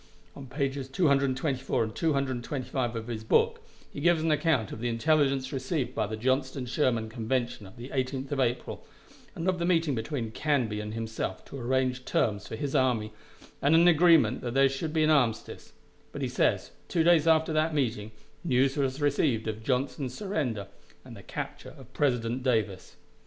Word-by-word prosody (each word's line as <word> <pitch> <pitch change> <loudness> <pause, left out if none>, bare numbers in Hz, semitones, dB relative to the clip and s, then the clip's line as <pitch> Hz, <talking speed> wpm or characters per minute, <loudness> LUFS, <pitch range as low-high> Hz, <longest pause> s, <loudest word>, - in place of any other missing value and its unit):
On 135 - -9
pages 135 0 -2
224 135 -4 +1
and 110 0 -5
225 130 -4 -1
of 115 -1 -4
his 115 -2 -5
book, 110 - +2 0.3
he - - -6
gives 170 0 +3
an 160 - +2
account 150 - +1
of - - -7
the 120 +1 -1
intelligence 135 +1 +1
received 130 -1 -2
of 110 -2 -1
the 110 - -4
Johnston 130 +2 0
Sherman 120 -3 0
convention 120 -1 -2
of 95 - -16
the 120 +2 -8
18th 130 0 -3
of 140 - -1
April, 120 -1 -1 0.5
and 165 - -3
of 185 -1 +1
the - - -1
meeting 165 -4 +2
between 115 -1 -3
Canby 125 -6 0
and 105 +1 -5
himself 115 -1 -4
to 140 - -8
arrange 130 +1 0
terms 100 -5 0
for - - -5
his 135 +4 -4
army, 120 -6 +1 0.5
and 145 +3 +4
an 170 +2 +6
agreement 160 -8 +5
that 120 0 -4
there 135 0 +5
should 135 +4 -3
be 155 0 +2
an 155 - +4
armistice; 125 -7 0 0.4
but - - -5
he - - +1
says, - - 0 0.2
two 165 - +1
days 165 -2 +4
after 160 0 +3
that 155 +1 +1
meeting, 110 -7 -1 0.3
news 135 -3 +2
was 135 0 -1
received 140 -6 +1
of 110 0 -4
Johnston's 130 +1 -2
surrender, 145 - -2 0.4
and 125 -3 -10
the 100 - -11
capture - - -7
of 130 -1 -15
President 125 -3 0
Davis. 110 -7 -1
130 Hz, 180 wpm, -28 LUFS, 115-145 Hz, 0.5 s, an